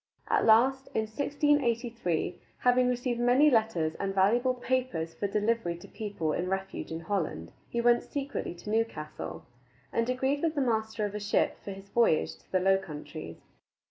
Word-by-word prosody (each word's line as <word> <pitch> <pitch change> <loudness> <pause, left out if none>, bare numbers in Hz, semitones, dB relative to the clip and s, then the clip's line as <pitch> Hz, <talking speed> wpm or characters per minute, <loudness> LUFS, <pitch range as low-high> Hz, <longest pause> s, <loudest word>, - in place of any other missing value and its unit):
At - - +3
last, 260 +5 +5
in - - +3
1683, 235 - 0 0.2
having 250 0 +4
received 245 -1 -1
many 255 +5 +5
letters 215 -9 +2
and 195 -1 -2
valuable 240 +7 +3
papers 245 -11 -1
for 200 - -2
delivery 210 -3 0
to 175 - -12
people 200 -8 -3
in 180 +1 -2
refuge 190 -2 -3
in 160 +1 -4
Holland, 160 - -2 0.2
he 235 - -1
went 240 0 +4
secretly 280 -10 -4
to 210 +4 -7
Newcastle, 185 -9 -3 0.5
and 230 +1 +1
agreed 265 +3 0
with 325 -1 0
the 285 - +1
master 220 -3 0
of 205 - -4
a 210 - -3
ship 205 +1 +1
for - - -7
his 195 0 -9
voyage 225 -8 +2
to - - -29
the 185 - +3
Low 190 +1 +4
Countries. 155 -6 -8
220 Hz, 170 wpm, -29 LUFS, 190-250 Hz, 0.5 s, last